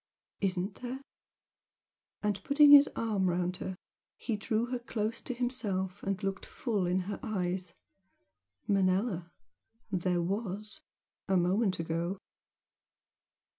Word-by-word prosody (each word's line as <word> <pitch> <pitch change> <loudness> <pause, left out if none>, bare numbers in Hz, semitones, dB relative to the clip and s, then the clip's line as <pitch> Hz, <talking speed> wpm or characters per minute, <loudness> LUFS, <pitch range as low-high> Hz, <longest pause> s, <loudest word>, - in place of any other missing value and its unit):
"Isn't 190 0 0
there?" 255 +1 -4 1.2
and 205 -2 0
putting 290 +1 +6
his 285 0 +10
arm 205 -5 +1
round 180 +1 0
her, 190 - -4 0.4
he 230 - -2
drew 220 +2 0
her 250 - -1
close 225 -1 -3
to - - -5
himself 205 -6 -2
and 195 +1 -2
looked 195 0 -2
full 220 -11 -1
in 180 +1 +1
her 200 +3 -5
eyes 185 -4 -2 0.9
"Manella 185 -2 +1 0.6
there 180 -2 +1
WAS! 205 +2 -3 0.5
a 190 -1 +3
moment 185 +2 +2
ago!" 165 +3 -2
195 Hz, 115 wpm, -31 LUFS, 185-225 Hz, 1.2 s, his